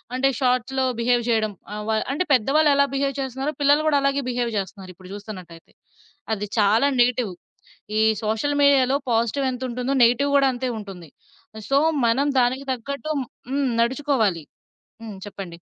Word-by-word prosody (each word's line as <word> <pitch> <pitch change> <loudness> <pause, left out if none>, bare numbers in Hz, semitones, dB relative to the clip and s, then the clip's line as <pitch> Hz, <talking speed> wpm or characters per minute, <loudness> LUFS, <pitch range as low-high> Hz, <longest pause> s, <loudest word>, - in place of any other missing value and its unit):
అంటే 270 +1 +2
షార్ట్స్‌లో 255 +1 +1
బిహేవ్ 240 0 +2
చేయడం, 215 -2 +1 0.2
ఆహ్, 210 - -5
వ 220 - +2 0.2
అంటే 365 +6 -1
పెద్దవాళ్ళెలా 280 +3 +3
బిహేవ్ 275 -1 -1
చేస్తున్నారో 265 +3 -3
పిల్లలు 290 +2 +4
గూడా 290 -2 +3
అలాగే 275 0 +1
బిహేవ్ 240 -1 -1
చేస్తున్నారు 190 -1 -6
ఇప్పుడు 185 0 -14
జూస్తున్నట్టయితే. 185 -5 -10 0.6
అది 210 0 -3
చాలా 215 +7 +4
నెగెటివ్. 240 -4 +2 0.7
ఈ - - +3 0.2
సోషల్ 225 +7 0
మీడియా‌లో 275 -1 +4
పాజిటివ్ 235 +4 +1
ఎంతుంటుందో 250 +1 -3
నెగెటివ్ 280 +4 +2
గూడా 275 -1 +4
అంతే 250 0 -3
ఉంటుంది. 185 -7 -10 0.6
సో, 275 - +3 0.3
మనం 265 +5 +2
దానికి 260 +3 0
తగ్గట్టు 280 +5 -5 0.4
హ్మ్. 275 -1 0
నడుచుకోవాలి. 235 - 0 0.6
హ్మ్. 215 -4 -8
చెప్పండి. 180 -4 -8
250 Hz, 140 wpm, -23 LUFS, 215-275 Hz, 0.7 s, పిల్లలు